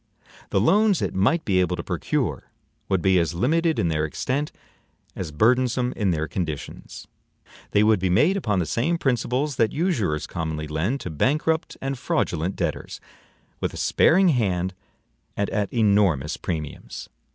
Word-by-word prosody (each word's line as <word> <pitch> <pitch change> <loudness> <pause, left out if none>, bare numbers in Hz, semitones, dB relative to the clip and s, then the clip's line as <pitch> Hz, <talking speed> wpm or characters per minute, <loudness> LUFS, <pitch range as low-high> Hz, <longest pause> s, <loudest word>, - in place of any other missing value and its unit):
The - - +2
loans 200 - +4
it - - -2
might 135 - +2
be 95 -3 +2
able 90 0 0
to 85 - -5
procure - - -2 0.4
would 95 -3 +1
be 95 -1 +4
as 85 0 -1
limited 160 - +1
in 85 - +1
their 75 -1 0
extent 130 - -2 0.6
as 85 -5 -5
burdensome 125 - +2
in 105 -4 0
their 80 -2 0
conditions. 80 -6 -6 0.6
They 105 - +3
would 110 -2 +4
be 95 0 0
made 150 - +4
upon 105 - 0
the 90 - +1
same 150 - 0
principles 130 0 0
that 115 - +2
usurers 115 - 0
commonly 80 -2 -4
lend 90 - -1
to 90 - -5
bankrupt 150 - 0
and 135 -1 -3
fraudulent 85 +5 -1
debtors, - - -3 0.6
with - - -3
a - - -7
sparing 185 +2 +4
hand 95 - 0 0.6
and 100 - -1
at 105 0 -1
enormous 100 - +2
premiums. 80 -4 -6
100 Hz, 155 wpm, -24 LUFS, 85-135 Hz, 0.6 s, loans